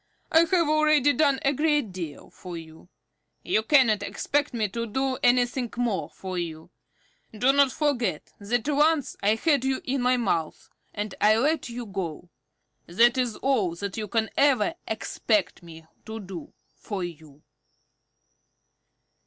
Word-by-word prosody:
I 320 - +6
have 335 -1 +2
already 305 -2 +4
done 280 -3 +2
a 275 - +3
great 295 -6 +1
deal 170 -6 -7
for 180 -2 -9
you. 160 +1 -13 0.5
You 215 - +1
cannot 225 -3 +4
expect 290 +1 -1
me 225 -3 -1
to 230 +4 -4
do 265 +4 -1
anything 245 0 +2
more 235 -5 -1
for 185 -1 -6
you. 160 -2 -6 0.7
Do 255 +5 +3
not 280 -2 +4
forget 245 - -1
that 225 +5 -2
once 300 0 +2
I 210 +2 +3
had 285 +1 +1
you 265 0 0
in 265 0 -1
my 250 +1 +3
mouth, 170 -9 -2 0.2
and 205 -1 -4
I 215 +1 +5
let 290 +2 0
you 240 0 -6
go. 180 -4 -6 0.6
That 235 +8 +4
is 250 -4 -1
all 215 -11 0
that 200 +2 -5
you 215 -1 -4
can 220 0 -1
ever 270 -7 +3
expect 215 -3 -1
me 165 -2 -13 0.2
to 220 0 -6
do 190 -4 -9 0.2
for 200 -4 -5
you." 155 -4 -10
230 Hz, 150 wpm, -26 LUFS, 190-275 Hz, 0.7 s, I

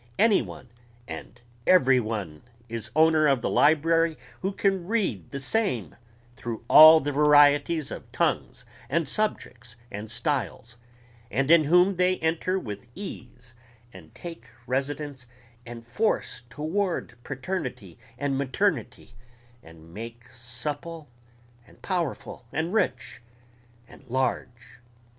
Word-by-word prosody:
Any 220 -2 +4
one 125 - -10 0.4
and 80 +9 -9 0.3
every 135 -8 +5
one 105 -9 -4 0.3
is 115 -1 -6
owner 155 -1 +5
of 135 -4 +2
the - - 0
library 165 +2 +3 0.2
who 195 - -1
can 195 -3 0
read 190 - -1
the - - -6
same 135 - -1 0.4
through 115 -2 -6
all 155 +3 +10
the 145 -1 -3
varieties 145 +1 +4
of - - -9
tongues 125 +2 -1 0.2
and 165 -3 0
subjects 125 - -3 0.2
and 105 0 -7
styles, 120 -1 -3 0.5
and 135 +3 0
in 165 -2 +6
whom 180 +4 +4
they 180 +1 +2
enter 165 +3 0
with 105 - -7
ease 125 -10 -9 0.4
and 85 -4 -15
take 170 -1 -9 0.2
residence 135 0 -3 0.4
and 115 -1 -9
force 210 - -1
toward 160 +2 -2
paternity 130 - -5 0.2
and 135 -1 -1
maternity, 130 - -1 0.5
and 80 0 -16
make 115 +2 -9
supple 140 +6 -7 0.6
and - - -21
powerful 170 -9 -3
and 165 +4 -2
rich 210 - -1 0.7
and - - -16
large.... 120 -2 -3
140 Hz, 120 wpm, -26 LUFS, 120-165 Hz, 0.7 s, all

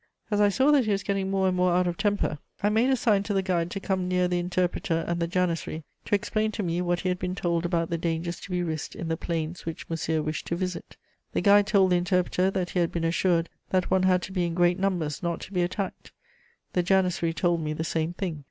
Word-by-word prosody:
As 205 0 +2
I 205 - +5
saw 265 +8 +3
that 280 -5 +4
he 215 - 0
was 195 -1 0
getting 195 -1 -1
more 195 -1 +2
and 185 - +1
more 180 -1 +3
out 180 +1 +3
of 175 -1 -1
temper, 205 -7 0 0.2
I 205 - +4
made 225 +5 +3
a 265 - +4
sign 220 -5 +2
to 205 0 -2
the 195 - +2
guide 175 -3 0
to 195 - -4
come 190 -2 -1
near 180 0 +2
the 180 0 0
interpreter 175 -2 -1
and 170 0 -1
the 170 - 0
janissary 170 -3 -1 0.2
to - - +2
explain 215 +1 0
to 210 - -2
me 175 0 -1
what 175 0 0
he 185 - -1
had 180 0 -1
been 180 0 -2
told 170 -2 0
about 170 -1 -1
the 170 - -1
dangers 170 +1 -2
to - - -10
be 180 -1 0
risked 160 -3 -4
in 165 - -5
the 165 - +1
plains 165 0 -3
which 165 -1 -6
Monsieur 160 -1 -1
wished 155 -1 -4
to 170 - -1
visit. 180 -1 -4 0.4
The - - +1
guide 205 0 +5
told 195 -3 +4
the 180 - +5
interpreter 180 +1 +1
that 190 -2 -2
he 180 - 0
had 170 -1 +1
been 170 - -2
assured 170 0 +2 0.2
that 185 -1 0
one 190 - +4
had 185 -1 +3
to - - -6
be 185 -2 0
in 170 -1 -2
great 175 +1 +3
numbers 175 -7 -1
not 170 -1 -2
to 200 - -9
be 180 - +1
attacked; 185 +2 -3 0.6
the 180 - +3
janissary 180 -2 +2
told 170 0 +1
me 155 -1 -2
the 160 - -3
same 160 +1 -1
thing. 175 -5 -4
180 Hz, 260 wpm, -27 LUFS, 170-190 Hz, 0.6 s, I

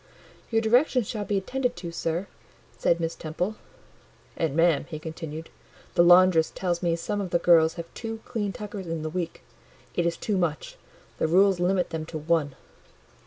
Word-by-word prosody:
"Your 225 -1 +1
directions 245 0 +3
shall 210 -2 -3
be 205 - 0
attended 250 +6 -1
to, 175 -1 -6
sir," 165 +2 -2 0.5
said 170 - +2
Miss 165 0 -1
Temple. 180 +6 -3 0.8
"And, 160 -4 -1
ma'am," 165 -3 +3
he 155 - -5
continued, 160 0 -7 0.4
"the - - +4
laundress 175 -2 +6
tells 175 -2 -2
me 170 -2 +1
some 205 +5 -3
of 190 - -4
the 175 - +2
girls 165 -2 +5
have 170 - -5
two 225 -1 -5
clean 215 -5 -2
tuckers 205 -2 -7
in 165 -1 -3
the 155 - -3
week: 175 -1 -4 0.5
it 170 -1 +1
is 170 - -1
too 210 -3 -1
much; 160 -4 -2 0.4
the - - +2
rules 190 +2 +4
limit 180 +1 +1
them 155 -1 -4
to 160 - -5
one." 155 -3 0
175 Hz, 175 wpm, -26 LUFS, 165-200 Hz, 0.8 s, laundress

